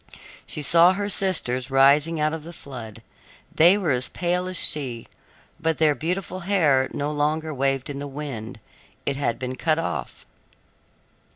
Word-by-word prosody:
She 150 Hz, -, -5 dB
saw 170 Hz, +4 st, +5 dB
her 200 Hz, +1 st, -3 dB
sisters 140 Hz, -11 st, -1 dB
rising 140 Hz, +4 st, +4 dB
out 155 Hz, +1 st, +1 dB
of 160 Hz, -2 st, -5 dB
the 170 Hz, -, -9 dB
flood. 115 Hz, -7 st, -10 dB, 0.5 s
They 175 Hz, +5 st, +6 dB
were 180 Hz, -7 st, 0 dB
as 125 Hz, 0 st, 0 dB
pale 180 Hz, +1 st, -1 dB
as 185 Hz, -1 st, +1 dB
she, 125 Hz, -9 st, +1 dB, 0.5 s
but 165 Hz, -1 st, 0 dB
their 155 Hz, -2 st, +4 dB
beautiful 180 Hz, +4 st, -3 dB
hair 160 Hz, -9 st, +2 dB
no 145 Hz, +1 st, -2 dB
longer 155 Hz, +1 st, -1 dB
waved 135 Hz, 0 st, 0 dB
in 140 Hz, -2 st, -5 dB
the 145 Hz, -, -5 dB
wind; 135 Hz, -7 st, -7 dB, 0.5 s
it 140 Hz, -, 0 dB
had 130 Hz, -4 st, -1 dB
been 130 Hz, 0 st, -4 dB
cut 155 Hz, +4 st, +1 dB
off. 165 Hz, -, -4 dB
150 Hz, 160 wpm, -24 LUFS, 135-170 Hz, 0.5 s, They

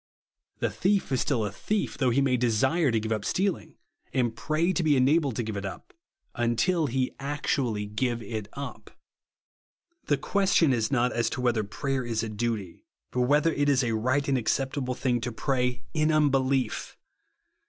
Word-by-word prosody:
The -, -, -1 dB
thief 195 Hz, -4 st, +1 dB
is 130 Hz, -, +1 dB
still 120 Hz, -7 st, 0 dB
a 100 Hz, -, -3 dB
thief; 210 Hz, -, -2 dB
though 130 Hz, -3 st, +1 dB
he 130 Hz, +4 st, +2 dB
may 135 Hz, -2 st, +2 dB
desire 130 Hz, +7 st, +2 dB
to 115 Hz, -2 st, +2 dB
give 110 Hz, +1 st, -4 dB
up 110 Hz, -2 st, -1 dB
stealing, 190 Hz, -, -1 dB, 0.4 s
and 120 Hz, -4 st, 0 dB
pray 155 Hz, +9 st, 0 dB
to 180 Hz, -, 0 dB
be 150 Hz, -4 st, +3 dB
enabled 140 Hz, 0 st, +3 dB
to 120 Hz, -, -1 dB
give 110 Hz, -1 st, -4 dB
it 100 Hz, -, -4 dB
up; 95 Hz, -, -7 dB, 0.4 s
until 145 Hz, +8 st, +1 dB
he 130 Hz, 0 st, -1 dB
actually 135 Hz, -6 st, -1 dB
give 120 Hz, +3 st, -1 dB
it 105 Hz, 0 st, -5 dB
uj^. 140 Hz, 0 st, -7 dB, 1.2 s
The -, -, +2 dB
question 190 Hz, -7 st, +2 dB
is 115 Hz, -3 st, 0 dB
not 125 Hz, -2 st, +1 dB
as 120 Hz, -1 st, +1 dB
to 125 Hz, -, -4 dB
whether 120 Hz, -3 st, +1 dB
prayer 135 Hz, +6 st, -2 dB
is 115 Hz, -2 st, -2 dB
a 115 Hz, -, -3 dB
duty; 105 Hz, -4 st, -4 dB, 0.2 s
but 125 Hz, -, 0 dB
whether 150 Hz, +3 st, +3 dB
it 145 Hz, 0 st, +1 dB
is 135 Hz, -2 st, +3 dB
a 115 Hz, -2 st, 0 dB
right 130 Hz, +6 st, +1 dB
and 135 Hz, -2 st, +2 dB
acceptable 130 Hz, +2 st, -1 dB
thing 125 Hz, -3 st, 0 dB
to 120 Hz, +1 st, -3 dB
prayi'n 130 Hz, +5 st, -1 dB
unbelief. 135 Hz, -5 st, +1 dB
130 Hz, 175 wpm, -27 LUFS, 115-145 Hz, 1.2 s, be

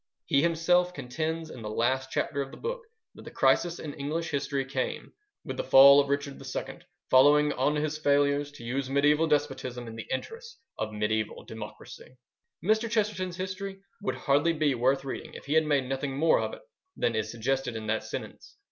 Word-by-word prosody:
He 140 Hz, -, +3 dB
himself 175 Hz, +2 st, +2 dB
contends 160 Hz, +5 st, -3 dB
in 120 Hz, -, -9 dB
the 105 Hz, -, -5 dB
last 130 Hz, +4 st, 0 dB
chapter 140 Hz, +1 st, -1 dB
of 135 Hz, -, -4 dB
the -, -, -11 dB
book 485 Hz, +2 st, -4 dB, 0.3 s
that -, -, -13 dB
the -, -, -9 dB
crisis 175 Hz, -1 st, +2 dB
in 150 Hz, -2 st, -6 dB
English 160 Hz, +3 st, -3 dB
history 140 Hz, -1 st, -1 dB
came 130 Hz, -1 st, -4 dB, 0.3 s
"with -, -, -5 dB
the -, -, -1 dB
fall 140 Hz, +1 st, +8 dB
of 140 Hz, -1 st, +1 dB
Richard 140 Hz, 0 st, -2 dB
II, -, -, -5 dB, 0.3 s
following 145 Hz, +3 st, +6 dB
on 145 Hz, +4 st, +1 dB
his 155 Hz, +1 st, -2 dB
failures 145 Hz, -1 st, +2 dB
to 130 Hz, -, -12 dB
use 130 Hz, +3 st, -2 dB
mediaeval 145 Hz, +3 st, +3 dB
despotism 145 Hz, -5 st, -1 dB
in 115 Hz, -1 st, -8 dB
the 115 Hz, -, -7 dB
interests 460 Hz, -, -5 dB, 0.2 s
of 110 Hz, 0 st, -2 dB
mediaeval 105 Hz, 0 st, -2 dB
democracy." 110 Hz, +3 st, -10 dB, 0.5 s
Mr. 220 Hz, +4 st, +2 dB
Chesterton's 205 Hz, -5 st, -1 dB
history 190 Hz, +1 st, -5 dB, 0.2 s
would 200 Hz, -, -2 dB
hardly 145 Hz, +4 st, +2 dB
be 150 Hz, -3 st, +1 dB
worth 130 Hz, +3 st, +1 dB
reading, 135 Hz, -, -6 dB
if -, -, -10 dB
he 140 Hz, -, -2 dB
had 160 Hz, 0 st, +4 dB
made 145 Hz, -3 st, +2 dB
nothing 135 Hz, +1 st, -3 dB
more 160 Hz, +2 st, +4 dB
of -, -, -3 dB
it -, -, -16 dB, 0.4 s
than 115 Hz, -, 0 dB
is 110 Hz, -1 st, -1 dB
suggested 125 Hz, +2 st, -2 dB
in 110 Hz, -1 st, -5 dB
that 110 Hz, +1 st, -1 dB
sentence. -, -, -8 dB
140 Hz, 190 wpm, -28 LUFS, 130-165 Hz, 0.5 s, fall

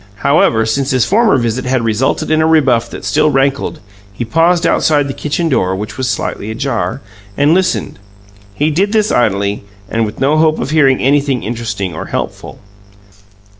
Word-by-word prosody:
However, 115 Hz, -6 st, +3 dB
since 135 Hz, +5 st, -1 dB
his 130 Hz, -4 st, +2 dB
former 220 Hz, -4 st, +3 dB
visit 120 Hz, +1 st, -2 dB
had 125 Hz, -1 st, 0 dB
resulted 115 Hz, +7 st, 0 dB
in 155 Hz, 0 st, +3 dB
a 160 Hz, -, +2 dB
rebuff 135 Hz, -8 st, +2 dB
that -, -, -9 dB
still 155 Hz, 0 st, +2 dB
rankled, 135 Hz, 0 st, 0 dB, 0.3 s
he 120 Hz, +4 st, -5 dB
paused 165 Hz, +7 st, +2 dB
outside 145 Hz, -2 st, +2 dB
the 135 Hz, -, -4 dB
kitchen 150 Hz, +5 st, -2 dB
door, 95 Hz, -, 0 dB
which 105 Hz, +3 st, -6 dB
was 130 Hz, -1 st, -2 dB
slightly 105 Hz, -, -3 dB
ajar, 115 Hz, -3 st, -3 dB, 0.4 s
and 145 Hz, +3 st, +3 dB
listened. 175 Hz, -, -1 dB, 0.6 s
He 150 Hz, +2 st, 0 dB
did 195 Hz, +7 st, 0 dB
this 215 Hz, -1 st, +2 dB
idly, 100 Hz, -4 st, 0 dB, 0.2 s
and 115 Hz, +3 st, -1 dB
with 105 Hz, 0 st, -5 dB
no 145 Hz, +4 st, +2 dB
hope 155 Hz, 0 st, +3 dB
of -, -, -4 dB
hearing 140 Hz, -4 st, +3 dB
anything 140 Hz, -2 st, +1 dB
interesting 110 Hz, -5 st, -4 dB
or 80 Hz, -, -6 dB
helpful. -, -, -5 dB
135 Hz, 170 wpm, -14 LUFS, 115-155 Hz, 0.6 s, However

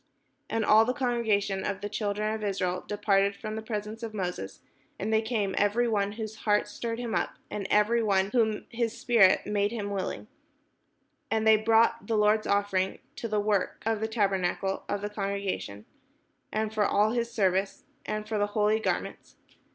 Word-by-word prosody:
" -, -, -46 dB
And 225 Hz, -1 st, 0 dB
all 215 Hz, +2 st, +7 dB
the 250 Hz, +3 st, -1 dB
congregation 220 Hz, -7 st, 0 dB
of 200 Hz, -1 st, -3 dB
the 205 Hz, -, -3 dB
children 210 Hz, 0 st, -2 dB
of 220 Hz, -1 st, -4 dB
Israel 185 Hz, -3 st, -1 dB
departed 200 Hz, -1 st, +2 dB
from 215 Hz, +1 st, -6 dB
the 220 Hz, -, -4 dB
presence 215 Hz, 0 st, -5 dB
of 225 Hz, -2 st, -6 dB
Moses. 180 Hz, -, -4 dB, 0.4 s
And 215 Hz, +3 st, -2 dB
they 220 Hz, -, +4 dB
came, 220 Hz, -4 st, -1 dB
every 215 Hz, +4 st, +2 dB
one 205 Hz, -2 st, 0 dB
whose 220 Hz, 0 st, -6 dB
heart 210 Hz, -1 st, +1 dB
stirred 230 Hz, +2 st, -4 dB
him 235 Hz, -2 st, -4 dB
up, -, -, -1 dB, 0.2 s
and 200 Hz, -2 st, -3 dB
every 215 Hz, +3 st, +3 dB
one 195 Hz, -2 st, +1 dB
whom 220 Hz, -4 st, +1 dB
his 235 Hz, -1 st, -2 dB
spirit 220 Hz, -6 st, +4 dB
made 205 Hz, +1 st, 0 dB
willing, 200 Hz, -, -3 dB, 1.0 s
and 220 Hz, 0 st, 0 dB
they 220 Hz, 0 st, +7 dB
brought 225 Hz, +1 st, +3 dB
the 225 Hz, -2 st, +1 dB
Lord's 210 Hz, +1 st, +3 dB
offering 195 Hz, -2 st, +1 dB, 0.2 s
to 230 Hz, -, -3 dB
the 215 Hz, -1 st, 0 dB
work 205 Hz, -2 st, 0 dB
of 225 Hz, -1 st, +1 dB
the 220 Hz, -, -1 dB
tabernacle 195 Hz, -3 st, 0 dB
of 205 Hz, -1 st, -1 dB
the 205 Hz, -, -3 dB
con 200 Hz, -1 st, -2 dB
gregation, 195 Hz, -, -4 dB, 0.7 s
and 215 Hz, 0 st, -1 dB
for 215 Hz, -1 st, +2 dB
all 210 Hz, +1 st, +3 dB
his 235 Hz, 0 st, -1 dB
service, 195 Hz, -1 st, 0 dB, 0.2 s
and 215 Hz, 0 st, -4 dB
for 215 Hz, -1 st, -1 dB
the 205 Hz, -, +2 dB
holy 210 Hz, +1 st, +3 dB
gar -, -, +1 dB
ments. -, -, -11 dB
210 Hz, 185 wpm, -28 LUFS, 200-220 Hz, 1.0 s, all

